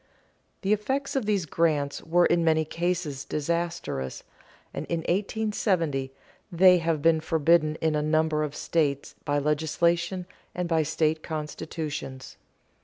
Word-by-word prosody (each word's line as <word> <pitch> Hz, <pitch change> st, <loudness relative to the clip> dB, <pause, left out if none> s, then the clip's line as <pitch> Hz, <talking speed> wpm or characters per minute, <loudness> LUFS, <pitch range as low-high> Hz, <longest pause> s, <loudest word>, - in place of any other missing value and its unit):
The 195 Hz, +2 st, +3 dB
effects 265 Hz, +8 st, -2 dB
of 255 Hz, -6 st, 0 dB
these 200 Hz, -5 st, +1 dB
grants 150 Hz, -3 st, 0 dB
were 175 Hz, +2 st, +3 dB
in 170 Hz, 0 st, +3 dB
many 160 Hz, -1 st, +3 dB
cases 165 Hz, -4 st, -2 dB
disastrous, 170 Hz, -, -3 dB, 0.5 s
and -, -, -5 dB
since 170 Hz, -1 st, -1 dB
1870 185 Hz, -7 st, 0 dB, 0.4 s
they 180 Hz, +1 st, +6 dB
have 165 Hz, -3 st, -1 dB
been 165 Hz, -1 st, +5 dB
forbidden 160 Hz, 0 st, +3 dB
in 160 Hz, -1 st, +2 dB
a 150 Hz, -, +1 dB
number 155 Hz, 0 st, +1 dB
of 150 Hz, -1 st, -3 dB
states 145 Hz, -4 st, -1 dB
by 145 Hz, -, +1 dB
legislation 170 Hz, +5 st, 0 dB, 0.3 s
and 180 Hz, 0 st, -2 dB
by 165 Hz, -1 st, +2 dB
state 155 Hz, +1 st, 0 dB
constitutions. 150 Hz, -3 st, -5 dB
160 Hz, 130 wpm, -27 LUFS, 150-175 Hz, 0.5 s, they